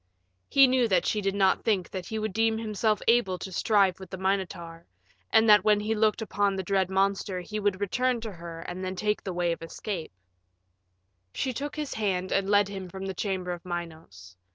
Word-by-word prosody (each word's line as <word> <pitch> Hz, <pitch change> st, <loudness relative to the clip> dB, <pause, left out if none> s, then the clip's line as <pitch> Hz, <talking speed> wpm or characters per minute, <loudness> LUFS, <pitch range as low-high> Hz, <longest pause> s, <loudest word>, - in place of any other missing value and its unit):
He 275 Hz, -1 st, +7 dB
knew 255 Hz, -2 st, +3 dB
that 185 Hz, -5 st, +2 dB
she 210 Hz, -, 0 dB
did 195 Hz, 0 st, -1 dB
not 190 Hz, -1 st, +2 dB
think 195 Hz, -6 st, +1 dB
that 185 Hz, -2 st, -5 dB
he 220 Hz, -, -4 dB
would 215 Hz, -2 st, -3 dB
deem 225 Hz, +1 st, +2 dB
himself 215 Hz, -1 st, 0 dB
able 225 Hz, -6 st, +3 dB
to 190 Hz, +2 st, -7 dB
strive 195 Hz, -1 st, +2 dB
with 190 Hz, -2 st, -10 dB
the 190 Hz, -, -6 dB
Minotaur, 175 Hz, -3 st, -3 dB, 0.4 s
and 220 Hz, +1 st, +4 dB
that 210 Hz, -2 st, +7 dB
when 210 Hz, -1 st, +4 dB
he 215 Hz, +2 st, -1 dB
looked 220 Hz, 0 st, +1 dB
upon 205 Hz, -2 st, 0 dB
the 190 Hz, -, -3 dB
dread 190 Hz, 0 st, +1 dB
monster 195 Hz, -1 st, 0 dB
he 210 Hz, +4 st, -5 dB
would 200 Hz, -2 st, 0 dB
return 250 Hz, +5 st, 0 dB
to 220 Hz, -1 st, -5 dB
her 170 Hz, -2 st, -9 dB
and 180 Hz, +2 st, -6 dB
then 185 Hz, 0 st, -3 dB
take 210 Hz, +3 st, -1 dB
the 190 Hz, -, -4 dB
way 175 Hz, -1 st, 0 dB
of 165 Hz, -, -3 dB
his 165 Hz, -, -9 dB
escape. 180 Hz, -, -5 dB, 1.2 s
She 260 Hz, -1 st, -1 dB
took 285 Hz, +4 st, -5 dB
his 300 Hz, -2 st, -4 dB
hand 185 Hz, -4 st, -1 dB
and 195 Hz, 0 st, +1 dB
led 205 Hz, -1 st, +4 dB
him 190 Hz, -2 st, -7 dB
from 190 Hz, +2 st, -7 dB
the 190 Hz, -, -3 dB
chamber 185 Hz, -1 st, -2 dB
of 175 Hz, -1 st, -6 dB
Minos. 160 Hz, -, -7 dB
195 Hz, 215 wpm, -27 LUFS, 180-215 Hz, 1.2 s, He